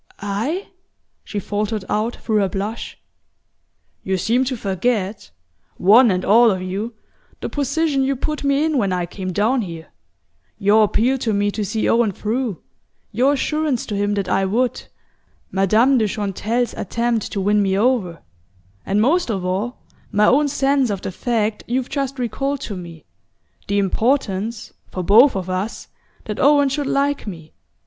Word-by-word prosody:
"I?" 225 Hz, -, -2 dB, 0.5 s
she 210 Hz, -, -7 dB
faltered 210 Hz, 0 st, -2 dB
out 220 Hz, +3 st, -1 dB
through 220 Hz, -2 st, -1 dB
her 200 Hz, -2 st, +2 dB
blush. 205 Hz, +5 st, -5 dB, 1.0 s
"You 190 Hz, 0 st, -1 dB
seem 235 Hz, +8 st, +1 dB
to 255 Hz, -1 st, -2 dB
forget, 200 Hz, 0 st, -2 dB, 0.5 s
one 225 Hz, +6 st, +6 dB
and 185 Hz, -1 st, 0 dB
all 230 Hz, +3 st, +6 dB
of 190 Hz, -3 st, 0 dB
you, 195 Hz, +5 st, -4 dB, 0.4 s
the -, -, -4 dB
position 290 Hz, 0 st, 0 dB
you 270 Hz, +1 st, +1 dB
put 300 Hz, +4 st, -3 dB
me 280 Hz, +2 st, +2 dB
in 310 Hz, -4 st, +1 dB
when 200 Hz, -4 st, 0 dB
I 180 Hz, -1 st, 0 dB
came 185 Hz, +1 st, -5 dB
down 225 Hz, +8 st, +1 dB
here: 165 Hz, -5 st, -7 dB, 0.7 s
your 215 Hz, +1 st, +4 dB
appeal 240 Hz, +6 st, +1 dB
to 225 Hz, -3 st, -1 dB
me 205 Hz, 0 st, +1 dB
to 210 Hz, -, -3 dB
see 215 Hz, +3 st, -1 dB
Owen 230 Hz, -2 st, +3 dB
through, 220 Hz, 0 st, -3 dB, 0.5 s
your 260 Hz, +6 st, +3 dB
assurance 300 Hz, -2 st, -1 dB
to 210 Hz, -, -4 dB
him 205 Hz, +1 st, 0 dB
that 200 Hz, -1 st, -2 dB
I 195 Hz, -, +1 dB
would, 235 Hz, +6 st, 0 dB, 0.7 s
Madame 220 Hz, +7 st, +3 dB
de 215 Hz, -, +2 dB
Chantelle's 210 Hz, +4 st, -2 dB
attempt 235 Hz, +1 st, -2 dB
to 200 Hz, -, -1 dB
win 205 Hz, +2 st, +2 dB
me 195 Hz, -1 st, +1 dB
over; 205 Hz, -, 0 dB, 0.6 s
and 200 Hz, +2 st, 0 dB
most 330 Hz, +4 st, +2 dB
of 190 Hz, -5 st, -2 dB
all, 200 Hz, +7 st, -3 dB, 0.3 s
my 210 Hz, 0 st, +3 dB
own 285 Hz, +6 st, +4 dB
sense 275 Hz, -2 st, +1 dB
of 200 Hz, -2 st, -3 dB
the -, -, -3 dB
fact 220 Hz, +1 st, -1 dB
you've 250 Hz, +1 st, -1 dB
just 275 Hz, -1 st, -2 dB
recalled 270 Hz, +3 st, -2 dB
to 205 Hz, -, -5 dB
me: 170 Hz, -3 st, -10 dB, 0.6 s
the 200 Hz, -, 0 dB
importance, 220 Hz, +1 st, 0 dB, 0.2 s
for 185 Hz, -, -4 dB
both 230 Hz, +9 st, +6 dB
of 190 Hz, -2 st, -3 dB
us, 185 Hz, +4 st, -4 dB, 0.4 s
that 210 Hz, -, -5 dB
Owen 285 Hz, 0 st, +5 dB
should 280 Hz, +1 st, -2 dB
like 280 Hz, -2 st, 0 dB
me. 165 Hz, -5 st, -9 dB
220 Hz, 165 wpm, -20 LUFS, 195-260 Hz, 1.0 s, one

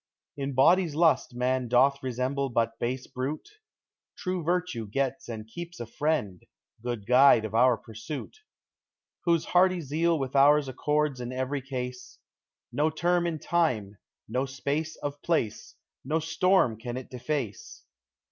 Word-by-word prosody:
In 140 Hz, -1 st, -4 dB
body's 170 Hz, +4 st, +4 dB
lust 155 Hz, -7 st, +2 dB
man 125 Hz, 0 st, 0 dB
doth 135 Hz, +4 st, +3 dB
resemble 130 Hz, +2 st, -1 dB
but 115 Hz, -1 st, 0 dB
base 125 Hz, +2 st, -2 dB
brute; 140 Hz, -, -5 dB, 0.7 s
^True 185 Hz, -1 st, -3 dB
virtue 175 Hz, -9 st, -1 dB
gets 135 Hz, +4 st, -2 dB
and 110 Hz, -2 st, -6 dB
keeps 175 Hz, +8 st, -8 dB
a 120 Hz, -, -4 dB
friend, 115 Hz, -, -1 dB, 0.4 s
good 120 Hz, -4 st, -4 dB
guide 125 Hz, -2 st, +6 dB
of 110 Hz, -, -6 dB
our 120 Hz, +1 st, +4 dB
pursuit, 120 Hz, -, -8 dB, 0.9 s
Whose 170 Hz, -2 st, +2 dB
hearty 185 Hz, 0 st, +3 dB
zeal 165 Hz, +3 st, +1 dB
with 135 Hz, -1 st, -4 dB
ours 145 Hz, +1 st, +5 dB
accords 150 Hz, 0 st, 0 dB
in 120 Hz, 0 st, -5 dB
every 130 Hz, +2 st, -2 dB
case; 125 Hz, -1 st, -6 dB, 0.5 s
No 150 Hz, +2 st, +1 dB
term 175 Hz, +2 st, +1 dB
of 160 Hz, -3 st, -3 dB
time, 110 Hz, -, 0 dB, 0.3 s
no 125 Hz, +4 st, -1 dB
space 145 Hz, +4 st, -3 dB
of 145 Hz, 0 st, -6 dB
place, 115 Hz, -9 st, -1 dB, 0.3 s
no 150 Hz, +5 st, 0 dB
storm 165 Hz, -, +2 dB
can 120 Hz, +1 st, -5 dB
it 130 Hz, -, -8 dB
deface. 150 Hz, -, -4 dB
135 Hz, 140 wpm, -28 LUFS, 125-160 Hz, 0.9 s, guide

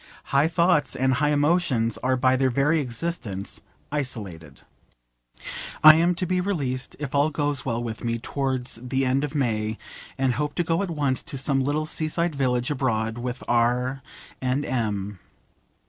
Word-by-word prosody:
High 140 Hz, +3 st, +5 dB
thoughts 165 Hz, -4 st, +2 dB
and 130 Hz, 0 st, +2 dB
high 145 Hz, +3 st, +2 dB
emotions 145 Hz, -6 st, +2 dB
are 130 Hz, 0 st, +1 dB
by 130 Hz, 0 st, +3 dB
their 130 Hz, 0 st, +2 dB
very 140 Hz, +6 st, +2 dB
existence 120 Hz, -, -4 dB, 0.3 s
isolated. 100 Hz, -, -4 dB, 1.2 s
I 155 Hz, 0 st, +12 dB
am 170 Hz, +3 st, +3 dB
to 180 Hz, -, -2 dB
be 180 Hz, +1 st, 0 dB
released, 140 Hz, -10 st, -2 dB
if 145 Hz, -3 st, -5 dB
all 145 Hz, +2 st, +3 dB
goes 145 Hz, -3 st, -1 dB
well 120 Hz, -2 st, -1 dB
with 115 Hz, 0 st, -5 dB
me, 115 Hz, 0 st, 0 dB
towards 130 Hz, -1 st, -2 dB
the 130 Hz, +2 st, -1 dB
end 130 Hz, +2 st, +1 dB
of 150 Hz, +1 st, -4 dB
May, 110 Hz, -5 st, 0 dB, 0.4 s
and 135 Hz, -2 st, +1 dB
hope 150 Hz, +2 st, -2 dB
to 175 Hz, -, +1 dB
go 165 Hz, +1 st, 0 dB
at 200 Hz, -, -2 dB
once 145 Hz, -5 st, 0 dB
to 160 Hz, -4 st, -3 dB
some 135 Hz, 0 st, +1 dB
little 150 Hz, +3 st, 0 dB
sea 155 Hz, 0 st, -1 dB
side 170 Hz, +1 st, 0 dB
village 125 Hz, -2 st, 0 dB
abroad 115 Hz, -4 st, -1 dB
with 125 Hz, +1 st, -4 dB
R 125 Hz, +3 st, +1 dB, 0.4 s
and 130 Hz, +3 st, 0 dB
M 105 Hz, -5 st, -2 dB
135 Hz, 165 wpm, -25 LUFS, 120-150 Hz, 1.2 s, I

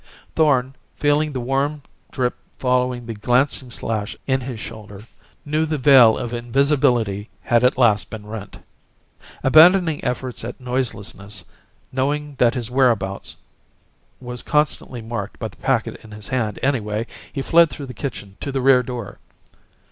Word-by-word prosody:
Thorn, 135 Hz, -4 st, +2 dB, 0.2 s
feeling 150 Hz, +1 st, +1 dB
the 130 Hz, -, -3 dB
warm 135 Hz, +4 st, -1 dB, 0.3 s
drip 125 Hz, -2 st, 0 dB, 0.2 s
following 125 Hz, -1 st, 0 dB
the 115 Hz, -, -5 dB
glancing 125 Hz, +4 st, +1 dB
slash 110 Hz, -3 st, -3 dB
in 130 Hz, -1 st, +1 dB
his 125 Hz, -3 st, -6 dB
shoulder, 105 Hz, -2 st, -9 dB, 0.4 s
knew 155 Hz, +2 st, +1 dB
the 155 Hz, -1 st, -1 dB
veil 130 Hz, -5 st, +7 dB
of 120 Hz, -1 st, -4 dB
invisibility 120 Hz, -4 st, +1 dB
had 120 Hz, -1 st, +2 dB
at 125 Hz, +1 st, +3 dB
last 110 Hz, -5 st, +3 dB
been 110 Hz, -2 st, -8 dB
rent. 105 Hz, -1 st, -8 dB, 0.9 s
Abandoning 165 Hz, +3 st, +6 dB
efforts 125 Hz, -1 st, -3 dB
at 120 Hz, +3 st, -6 dB
noiselessness, 110 Hz, -5 st, -3 dB, 0.5 s
knowing 145 Hz, +3 st, -1 dB
that 120 Hz, +1 st, +4 dB
his 120 Hz, -2 st, -3 dB
whereabouts 115 Hz, -7 st, +1 dB, 0.8 s
was 125 Hz, -1 st, -5 dB
constantly 150 Hz, -5 st, -1 dB
marked 115 Hz, -2 st, -5 dB
by 110 Hz, -, -4 dB
the -, -, -19 dB
packet 130 Hz, -4 st, -1 dB
in 110 Hz, -, -13 dB
his 105 Hz, -1 st, -9 dB
hand, 110 Hz, -5 st, -1 dB
anyway, 115 Hz, -5 st, 0 dB, 0.3 s
he 135 Hz, -, -3 dB
fled 170 Hz, +2 st, +5 dB
through 145 Hz, -, -7 dB
the 130 Hz, -, -8 dB
kitchen 105 Hz, -9 st, -6 dB
to 140 Hz, -, -4 dB
the 135 Hz, -, -1 dB
rear 130 Hz, -1 st, +5 dB
door. 120 Hz, -4 st, -7 dB
125 Hz, 150 wpm, -21 LUFS, 110-135 Hz, 0.9 s, veil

